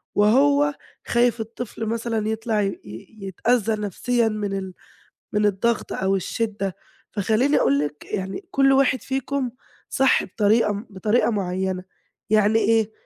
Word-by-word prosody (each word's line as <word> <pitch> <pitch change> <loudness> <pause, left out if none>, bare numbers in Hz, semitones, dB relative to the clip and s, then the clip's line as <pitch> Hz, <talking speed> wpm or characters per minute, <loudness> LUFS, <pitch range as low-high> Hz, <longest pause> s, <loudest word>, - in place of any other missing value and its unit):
وهو 280 +7 +4 0.3
خايف 240 0 +2
الطفل 225 0 -6
مثلًا 225 -1 -2
يطلع 220 -1 -1
ي 200 - +1 0.2
ي 110 - -11
يتأذّى 225 +3 +1
نَفْسيًا 230 +4 0
من 210 -2 -2
ال 190 -1 -6 0.6
من 210 0 +2
الضغط 210 +3 0
أو 190 +1 0
الشدّة، 200 -1 -2 0.4
فخلّيني 225 +8 +2
أقول 140 +1 +3
لِك 150 0 -4
يعني 190 - -4
كل 270 -1 +4
واحد 265 -2 +3
فيكم 265 -1 -2 0.4
صح 270 -1 +3
بطريقة 210 +2 +2
م 205 +4 -6
بطريقة 210 +5 +1
معيّنة 190 -3 -2 0.5
يعني 215 +1 +4
إيه 220 0 +2
220 Hz, 135 wpm, -23 LUFS, 195-240 Hz, 0.6 s, وهو